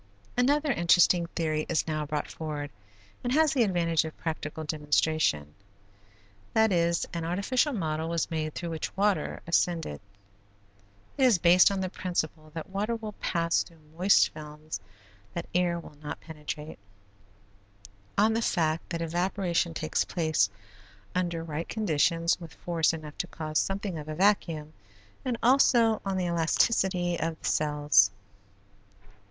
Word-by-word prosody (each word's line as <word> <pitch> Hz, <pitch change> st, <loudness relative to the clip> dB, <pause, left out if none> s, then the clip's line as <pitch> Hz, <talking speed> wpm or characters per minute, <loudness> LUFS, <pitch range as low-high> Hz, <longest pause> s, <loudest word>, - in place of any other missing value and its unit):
Another 285 Hz, +4 st, +2 dB
interesting 175 Hz, -2 st, +4 dB
theory 155 Hz, -2 st, -1 dB
is 170 Hz, -, +1 dB
now 155 Hz, -1 st, -2 dB
brought 150 Hz, 0 st, -2 dB
forward 150 Hz, -2 st, -5 dB, 0.5 s
and 245 Hz, -, -1 dB
has 315 Hz, +1 st, +4 dB
the 265 Hz, -, +2 dB
advantage 170 Hz, -6 st, +2 dB
of 160 Hz, -1 st, -7 dB
practical 160 Hz, -1 st, -4 dB
demonstration, 150 Hz, -, 0 dB, 1.0 s
that 220 Hz, -1 st, +4 dB
is, 170 Hz, -1 st, +2 dB
an 170 Hz, -1 st, -3 dB
artificial 200 Hz, -, +1 dB
model 160 Hz, -, -2 dB
was 170 Hz, -1 st, -1 dB
made 155 Hz, -1 st, -2 dB
through 170 Hz, -1 st, -4 dB
which 160 Hz, +4 st, -5 dB
water 205 Hz, 0 st, 0 dB
ascended. 170 Hz, -, 0 dB, 1.2 s
It 265 Hz, -, +5 dB
is 240 Hz, -7 st, +5 dB
based 175 Hz, +1 st, +6 dB
on 195 Hz, -1 st, -2 dB
the 185 Hz, -, -1 dB
principle 160 Hz, -4 st, -3 dB
that 165 Hz, +3 st, -6 dB
water 210 Hz, +4 st, -1 dB
will 220 Hz, -2 st, -6 dB
pass 170 Hz, -4 st, 0 dB
through 165 Hz, -, -10 dB, 0.2 s
moist 185 Hz, +4 st, +5 dB
films 150 Hz, 0 st, -8 dB, 0.6 s
that 170 Hz, -, -3 dB
air 175 Hz, -1 st, +1 dB
will 155 Hz, -, -12 dB
not 150 Hz, -, -6 dB
penetrate, 150 Hz, -2 st, -7 dB, 1.4 s
on 215 Hz, +2 st, +4 dB
the 225 Hz, -, 0 dB
fact 165 Hz, -6 st, 0 dB
that 170 Hz, 0 st, -2 dB
evaporation 175 Hz, 0 st, 0 dB
takes 155 Hz, -1 st, 0 dB
place 155 Hz, -, +1 dB, 0.6 s
under 175 Hz, -2 st, -1 dB
right 160 Hz, 0 st, -5 dB
conditions 170 Hz, -4 st, +1 dB
with 165 Hz, -2 st, -10 dB
force 165 Hz, -3 st, +1 dB
enough 155 Hz, -2 st, -8 dB
to -, -, -1 dB
cause 155 Hz, -1 st, -2 dB
something 195 Hz, -3 st, -2 dB
of 150 Hz, -, -8 dB
a 155 Hz, -, -4 dB
vacuum, 165 Hz, -5 st, +1 dB, 0.5 s
and 250 Hz, -2 st, -1 dB
also 235 Hz, -3 st, +4 dB
on 195 Hz, -1 st, -2 dB
the 185 Hz, -, 0 dB
elasticity 175 Hz, +1 st, +1 dB
of 165 Hz, -1 st, -2 dB
the -, -, -10 dB
cells. 145 Hz, -9 st, +4 dB
170 Hz, 145 wpm, -28 LUFS, 155-190 Hz, 1.4 s, based